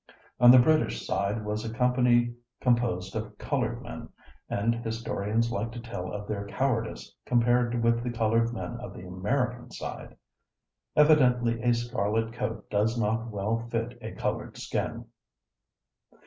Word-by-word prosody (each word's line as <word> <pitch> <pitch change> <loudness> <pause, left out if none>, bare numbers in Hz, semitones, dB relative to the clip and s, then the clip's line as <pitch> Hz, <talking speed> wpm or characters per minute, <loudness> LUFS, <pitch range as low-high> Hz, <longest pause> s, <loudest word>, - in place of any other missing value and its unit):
On 120 - +8
the 130 - +10
British 125 - +3
side 105 +2 -1
was 105 +1 -2
a 115 - -4
company 125 0 +3 0.3
composed 120 -7 +1
of - - -5
colored - - -2
men, - - -8 0.4
and 110 +3 +1
historians 115 -1 -1
like 110 +1 -2
to 120 - -6
tell 100 -6 -6
of 105 0 -5
their 100 -1 -3
cowardice 115 +1 -2
compared 120 0 +2
with 115 0 +2
the 125 - -2
colored 115 0 +1
men 120 0 -5
of 125 - -8
the 90 - -9
American 120 +7 -2
side. - - -7 0.8
Evidently 125 -6 +4
a 120 +1 +3
scarlet 115 -1 -1
coat 115 -3 -4
does 110 +3 +1
not 115 +2 0
well 105 +2 -1
fit 115 0 -2
a - - -6
colored - - -3
skin. - - -3
115 Hz, 145 wpm, -28 LUFS, 110-120 Hz, 0.8 s, the